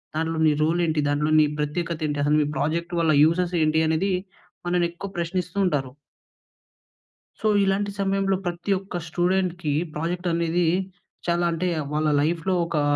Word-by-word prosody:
దాంట్లో 160 Hz, 0 st, -1 dB
నీ 155 Hz, -, +5 dB
రోల్ 165 Hz, +3 st, +1 dB
ఏంటి? 155 Hz, -1 st, 0 dB
దాంట్లో 150 Hz, +1 st, +1 dB
నీ 155 Hz, -, +6 dB
ప్రత్యేకత 165 Hz, +2 st, -2 dB
ఏంటి? 145 Hz, -1 st, -2 dB
అసలు 150 Hz, +1 st, +3 dB
మీ 145 Hz, -, 0 dB
ప్రాజెక్ట్ 170 Hz, +3 st, -1 dB
వల్ల 160 Hz, -1 st, +3 dB
యూజెస్ 175 Hz, +2 st, +2 dB
ఏంటి?" 155 Hz, +1 st, +2 dB
అనేది 160 Hz, +5 st, +1 dB, 0.6 s
మనల్ని 175 Hz, -1 st, +2 dB
ఎక్కువ 190 Hz, +3 st, -7 dB
ప్రశ్నిస్తూ 180 Hz, +2 st, -3 dB
ఉంటారు. 135 Hz, -7 st, -1 dB, 1.5 s
సో 220 Hz, -, -2 dB, 0.2 s
ఇలాంటి 195 Hz, +1 st, +1 dB
సమయంలో 195 Hz, 0 st, +1 dB
ప్రతి 175 Hz, +3 st, -3 dB
ఒక్క 190 Hz, -2 st, -7 dB
స్టూడెంట్‌కీ 175 Hz, -2 st, 0 dB, 0.2 s
ప్రాజెక్ట్ 175 Hz, +3 st, -2 dB
అనేదీ 170 Hz, +1 st, +1 dB, 0.6 s
చాలా 175 Hz, 0 st, +1 dB
అంటే 180 Hz, +2 st, -1 dB, 0.2 s
వాళ్ళ 155 Hz, +1 st, +1 dB
లైఫ్‌లో 170 Hz, +4 st, 0 dB
ఒకా, 155 Hz, -3 st, 0 dB
170 Hz, 150 wpm, -24 LUFS, 155-180 Hz, 1.5 s, నీ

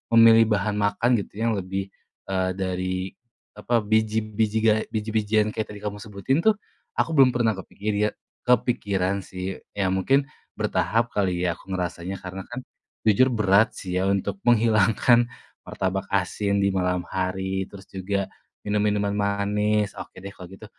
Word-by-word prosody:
memilih 115 Hz, 0 st, +8 dB
bahan 105 Hz, -1 st, +1 dB
makan 105 Hz, +4 st, +1 dB
gitu -, -, -12 dB
yang 115 Hz, -, +2 dB
lebih, 95 Hz, +1 st, -4 dB, 0.4 s
eee, 95 Hz, -1 st, +1 dB
dari 95 Hz, 0 st, -2 dB, 0.4 s
apa 120 Hz, -3 st, 0 dB
biji 110 Hz, +1 st, +1 dB
biji 110 Hz, 0 st, -1 dB
gae 110 Hz, -1 st, +3 dB
biji-bijian 110 Hz, 0 st, 0 dB
kayak 110 Hz, 0 st, -3 dB
tadi 105 Hz, -, -8 dB
kamu 105 Hz, 0 st, -4 dB
sebutin, 105 Hz, +7 st, -1 dB
tuh, 215 Hz, +5 st, +4 dB, 0.4 s
aku -, -, +1 dB
belum 135 Hz, -5 st, +5 dB
pernah 115 Hz, -2 st, +3 dB
kepikir 100 Hz, +1 st, -5 dB
iye 105 Hz, -, +3 dB, 0.4 s
kepikiran, 100 Hz, -6 st, +1 dB
sih, 95 Hz, +1 st, -5 dB, 0.2 s
ya, 95 Hz, -2 st, +1 dB
mungkin 135 Hz, +10 st, +2 dB, 0.3 s
bertahap 115 Hz, +1 st, 0 dB
kali 90 Hz, -3 st, 0 dB
ya 90 Hz, -, +2 dB
aku -, -, -19 dB
ngerasanya 90 Hz, +1 st, -3 dB
karena 95 Hz, +1 st, -7 dB
kan, 125 Hz, +1 st, -7 dB, 0.4 s
jujur 110 Hz, +4 st, +5 dB
berat, 105 Hz, -3 st, +3 dB
sih, 90 Hz, -1 st, -3 dB
ya, 95 Hz, -, +1 dB
untuk 100 Hz, 0 st, -1 dB
menghilangkan 115 Hz, +1 st, +4 dB, 0.4 s
martabak 95 Hz, 0 st, -2 dB
asin 100 Hz, +1 st, 0 dB
di 100 Hz, -, +3 dB
malam 90 Hz, -1 st, 0 dB
hari, 95 Hz, 0 st, -2 dB
terus 100 Hz, -1 st, -12 dB
juga 100 Hz, +1 st, -2 dB, 0.3 s
minum 105 Hz, 0 st, 0 dB
minuman 105 Hz, -1 st, +1 dB
manis, 105 Hz, 0 st, 0 dB
oke -, -, -9 dB
deh 100 Hz, -, -6 dB
kalo 90 Hz, -3 st, -11 dB
gitu. 95 Hz, +4 st, -12 dB
100 Hz, 155 wpm, -24 LUFS, 95-110 Hz, 0.4 s, memilih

